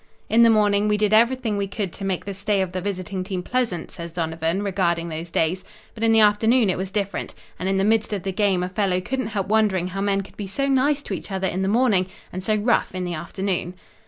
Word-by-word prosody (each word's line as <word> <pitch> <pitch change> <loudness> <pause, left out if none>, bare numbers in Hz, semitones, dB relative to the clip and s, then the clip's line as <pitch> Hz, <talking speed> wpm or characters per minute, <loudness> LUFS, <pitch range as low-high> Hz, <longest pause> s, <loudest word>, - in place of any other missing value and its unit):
"In 230 +2 +5
the 230 - +7
morning 210 -1 +3
we 210 0 +2
did 210 0 +1
everything 230 -1 +3
we 200 0 -1
could 200 -2 -4
to 200 - -8
make 190 -2 -2
the 200 - -4
stay 200 +1 0
of 185 - -5
the 185 0 -3
visiting 185 -1 -3
team 185 -1 -4
pleasant," 230 -7 -2
says 170 0 -7
Donovan, 165 +2 -2
regarding 170 -4 0
those 165 +1 -5
days, 165 +3 0 0.3
"but 225 - -6
in 225 - +4
the 225 - +5
afternoon 215 +1 +4
it - - -1
was 190 0 -3
different, 200 0 -3 0.2
and 185 - -1
in 195 - +1
the 195 - +2
midst 220 +1 +2
of 200 -4 -3
the 195 - -2
game 195 -2 +1
a 180 - -3
fellow 185 -1 0
couldn't 260 +6 -3
help 200 -4 -2
wondering 200 -4 +2
how 195 +1 -4
men 200 0 +1
could 195 - -14
be 205 - -5
so 275 +8 -1
nice 280 +2 +2
to - - -5
each - - -6
other 190 -1 -1
in 185 - -2
the 190 - 0
morning 210 -4 +3 0.3
and 185 +1 -5
so 215 +2 +1
rough 215 -1 +1
in 185 - -2
the 175 -1 -3
afternoon." 180 +2 -3
195 Hz, 250 wpm, -23 LUFS, 185-215 Hz, 0.3 s, the